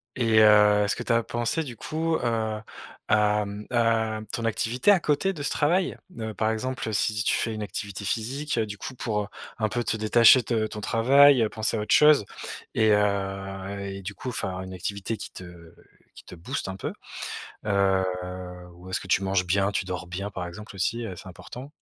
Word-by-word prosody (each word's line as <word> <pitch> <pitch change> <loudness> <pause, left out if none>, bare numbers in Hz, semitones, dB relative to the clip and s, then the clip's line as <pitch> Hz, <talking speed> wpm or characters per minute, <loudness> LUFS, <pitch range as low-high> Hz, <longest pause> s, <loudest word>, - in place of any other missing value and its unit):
Et 115 -3 +3
heu, 105 -1 +6
est-ce 100 - 0
que - - -6
tu - - -2
as 115 0 +3
pensé, 120 +9 -1
du 125 -5 -8
coup, 160 +7 -2
heu, 110 -3 -1 0.5
à, 105 -1 +3
mmh, 100 +1 -7
à 115 -2 +1
ton 115 - -3
activité 120 - +2
à 190 - +5
côté 155 +6 +1
de 150 - -7
ce - - 0
travail? 175 +5 +1 0.2
Heu, 110 -1 -4
par 110 0 +1
exemple, 110 0 -3
si 105 0 +1
tu - - +2
fais 115 -1 -1
une 110 - -4
activité 100 -1 -5
physique, 125 +6 -2
du 105 -2 -2
coup, 130 - -7
pour, 105 -4 -2
heu, - - -8 0.3
un 110 -2 0
peu 120 +3 -1
te 110 - -1
détacher 115 +3 +6
de 110 -1 0
ton 105 -1 -7
travail, 135 +4 +5
heu, 110 - +2
penser 110 +1 -1
à - - -2
autre 105 - +2
chose 150 -7 +6 0.5
et 110 -1 +4
heu, 100 -1 -1 0.2
et 100 - -7
du 100 - -5
coup, 125 +6 -6
faire 95 -4 -3
une 95 0 -8
activité 100 +4 -4
qui - - -8
te 85 -2 -12 0.4
qui - - -14
te - - -10
booste 110 +8 -4
un 95 - -4
peu? 95 - -5 0.7
Heu, 100 -2 +2 0.7
ou 90 +2 -13
est-ce 95 - -1
que - - -10
tu 100 - +2
manges 95 -1 +1
bien? 100 +3 +1
Tu 95 -1 -1
dors 90 -1 -5
bien? 95 +4 -4
Par 95 -3 -5
exemple 105 +4 -9
aussi, 115 +5 -1
heu, 95 - -6
c'est 95 - -10
important. 125 +9 -10
110 Hz, 210 wpm, -26 LUFS, 100-120 Hz, 0.7 s, heu